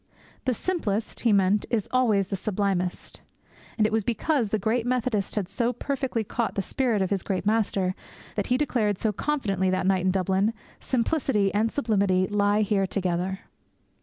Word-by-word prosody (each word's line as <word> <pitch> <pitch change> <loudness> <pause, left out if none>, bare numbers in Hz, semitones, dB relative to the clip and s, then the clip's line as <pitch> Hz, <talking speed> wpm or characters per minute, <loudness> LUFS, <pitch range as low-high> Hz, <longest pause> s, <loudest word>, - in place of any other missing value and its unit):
The 255 -2 +1
simplest, 225 - -2
He 235 - +2
meant, 200 +1 +3
is 220 -5 0
always 215 -7 +2
the 195 - -1
sublimest. 190 -2 -2 0.6
And 215 - +3
it 215 - 0
was 220 -1 +2
because 240 +2 0
the 215 - +1
great 220 +4 0
Methodist 240 -5 -1
had 205 -4 -1
so 235 +4 0
perfectly 260 -2 -2
caught 230 +2 -2
the 195 - 0
spirit 230 -2 0
of 190 - -3
his 195 -2 +1
great 185 -1 -2
Master 205 -4 +1 0.4
that 205 - -1
he 250 - +2
declared 225 -8 0
so 220 - 0
confidently 200 -8 0
that 185 -1 0
night 190 -1 +2
at - - +4
Dublin, 190 +3 +1 0.3
'Simplicity 240 -5 +1
and 220 +2 +1
sublimity 200 -8 +2
lie 205 +1 +2
here 195 -2 +1
together!' 185 0 -2
210 Hz, 170 wpm, -26 LUFS, 195-235 Hz, 0.6 s, at